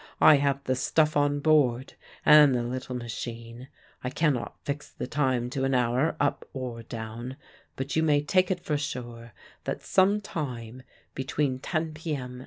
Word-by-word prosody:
I 155 Hz, -, +8 dB
have 140 Hz, -1 st, 0 dB
the 130 Hz, -1 st, 0 dB
stuff 155 Hz, +4 st, +2 dB
on 145 Hz, 0 st, +2 dB
board 140 Hz, -5 st, +2 dB, 0.3 s
and 150 Hz, -3 st, +8 dB
the 120 Hz, -, 0 dB
little 125 Hz, +1 st, -4 dB
machine. 115 Hz, +1 st, -6 dB, 0.4 s
I 125 Hz, -, -1 dB
cannot 140 Hz, -2 st, 0 dB
fix 145 Hz, 0 st, -4 dB
the -, -, -5 dB
time 130 Hz, -4 st, 0 dB
to 135 Hz, -1 st, -2 dB
an 135 Hz, 0 st, +1 dB
hour 125 Hz, +6 st, +1 dB
up 145 Hz, -, 0 dB
or 125 Hz, -3 st, -5 dB
down; 115 Hz, +2 st, -7 dB, 0.4 s
but 135 Hz, +2 st, -4 dB
you 160 Hz, -, +3 dB
may 150 Hz, -2 st, +3 dB
take 185 Hz, +4 st, +2 dB
it 180 Hz, -2 st, -1 dB
for 150 Hz, -, 0 dB
sure 120 Hz, -4 st, -6 dB, 0.3 s
that -, -, -3 dB
_some 195 Hz, +2 st, +3 dB
time 130 Hz, -, -5 dB, 0.3 s
between 135 Hz, 0 st, -1 dB
10 155 Hz, +2 st, -2 dB
p.m. 140 Hz, -6 st, -5 dB
135 Hz, 165 wpm, -27 LUFS, 125-150 Hz, 0.4 s, I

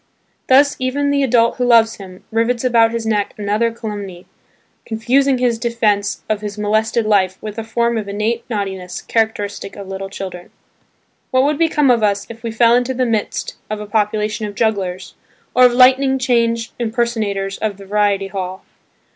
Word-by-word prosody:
Thus 280 Hz, +2 st, +5 dB
even 280 Hz, +3 st, 0 dB
the 285 Hz, 0 st, +2 dB
adult 235 Hz, -3 st, +2 dB
who 250 Hz, -, 0 dB
loves 230 Hz, -2 st, +4 dB
him, 185 Hz, -2 st, -12 dB
rivets 230 Hz, +2 st, 0 dB
about 230 Hz, -3 st, +4 dB
his 230 Hz, -1 st, -3 dB
neck 210 Hz, -2 st, -1 dB
another 210 Hz, +3 st, 0 dB
calumny, 205 Hz, -6 st, -7 dB, 0.6 s
confusing 255 Hz, +4 st, +1 dB
his 245 Hz, -2 st, 0 dB
defence 220 Hz, -4 st, 0 dB
of 215 Hz, -1 st, -1 dB
his 210 Hz, -1 st, -6 dB
molested 220 Hz, +2 st, 0 dB
life 190 Hz, -3 st, +2 dB
with 215 Hz, +1 st, -6 dB
a -, -, -4 dB
form 235 Hz, +1 st, 0 dB
of 210 Hz, -, -6 dB
innate 215 Hz, +4 st, -2 dB
naughtiness 190 Hz, -5 st, -4 dB
characteristic 205 Hz, -3 st, -2 dB
of 200 Hz, -1 st, -9 dB
little 195 Hz, 0 st, -6 dB
children. 185 Hz, -3 st, -7 dB, 0.8 s
What 255 Hz, 0 st, +3 dB
would 290 Hz, +1 st, 0 dB
become 300 Hz, -5 st, +3 dB
of 235 Hz, -2 st, +2 dB
us 205 Hz, -1 st, +1 dB
if 225 Hz, 0 st, -12 dB
we 230 Hz, -, -4 dB
fell 230 Hz, +1 st, +4 dB
into 250 Hz, +1 st, +1 dB
the 255 Hz, 0 st, +1 dB
midst 220 Hz, -3 st, -2 dB
of 215 Hz, 0 st, -3 dB
a 210 Hz, -, -6 dB
population 210 Hz, 0 st, -1 dB
of 205 Hz, -, -9 dB
jugglers, 195 Hz, -5 st, -2 dB, 0.4 s
or 255 Hz, -, +6 dB
of 245 Hz, -, +4 dB
lightning 265 Hz, +2 st, +5 dB
change 235 Hz, -2 st, 0 dB
impersonators 220 Hz, -4 st, -2 dB
of 210 Hz, -3 st, -2 dB
the 200 Hz, -, -12 dB
variety 200 Hz, -1 st, +1 dB
hall? 190 Hz, -1 st, -5 dB
220 Hz, 170 wpm, -18 LUFS, 205-240 Hz, 0.8 s, or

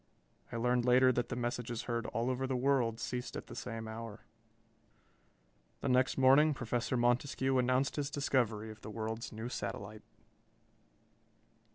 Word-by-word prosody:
I -, -, -5 dB
learned 125 Hz, +1 st, +2 dB
later 130 Hz, +1 st, +5 dB
that 120 Hz, -1 st, -1 dB
the 120 Hz, -, -2 dB
messages 120 Hz, -1 st, -3 dB
heard 115 Hz, -1 st, -2 dB
all 115 Hz, +3 st, -1 dB
over 130 Hz, +1 st, -2 dB
the 130 Hz, -, -1 dB
world 125 Hz, -3 st, +1 dB
ceased 125 Hz, 0 st, -4 dB
at -, -, -7 dB
the -, -, -10 dB
same 115 Hz, -2 st, -5 dB
hour. 110 Hz, -1 st, -7 dB, 1.6 s
The 140 Hz, -, -1 dB
next 130 Hz, +1 st, +3 dB
morning 140 Hz, +3 st, +6 dB
Professor 120 Hz, +1 st, -1 dB
Montescue 130 Hz, +2 st, +2 dB
announced 130 Hz, +3 st, +1 dB
his 145 Hz, -1 st, -1 dB
discovery 115 Hz, -7 st, 0 dB
of 110 Hz, 0 st, -13 dB
the -, -, -8 dB
world's 110 Hz, +2 st, -4 dB
new 110 Hz, +2 st, -5 dB
satellite. 105 Hz, -1 st, -5 dB
120 Hz, 150 wpm, -33 LUFS, 115-130 Hz, 1.6 s, morning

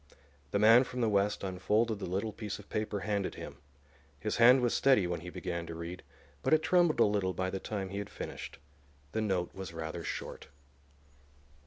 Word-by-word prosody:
The -, -, 0 dB
man 115 Hz, +4 st, +7 dB
from 125 Hz, -1 st, -5 dB
the 115 Hz, -, +3 dB
West 100 Hz, 0 st, +1 dB
unfolded 105 Hz, +4 st, 0 dB
the -, -, -4 dB
little 100 Hz, +4 st, -2 dB
piece 105 Hz, -1 st, -5 dB
of 105 Hz, -, -15 dB
paper 105 Hz, -2 st, -2 dB
handed 100 Hz, -2 st, -1 dB
him. -, -, -8 dB, 0.6 s
His 105 Hz, -, -2 dB
hand 125 Hz, +2 st, +7 dB
was 120 Hz, -1 st, +1 dB
steady 130 Hz, -8 st, +4 dB
when 85 Hz, -1 st, -2 dB
he 90 Hz, +2 st, -8 dB
began 85 Hz, -2 st, -4 dB
to 85 Hz, -, -6 dB
read, 85 Hz, +2 st, -6 dB, 0.4 s
but 155 Hz, -, +4 dB
it 155 Hz, -, 0 dB
trembled 175 Hz, -1 st, +3 dB
a -, -, +7 dB
little 100 Hz, -3 st, 0 dB
by 95 Hz, +2 st, -2 dB
the 95 Hz, -, -3 dB
time 100 Hz, -2 st, -4 dB
he 100 Hz, +1 st, -4 dB
had 100 Hz, 0 st, -5 dB
finished. -, -, -7 dB, 0.5 s
The 110 Hz, -, -1 dB
note 95 Hz, -5 st, -1 dB
was 95 Hz, -3 st, -7 dB
rather 80 Hz, +1 st, -5 dB
short. -, -, -6 dB
100 Hz, 195 wpm, -32 LUFS, 90-110 Hz, 0.6 s, man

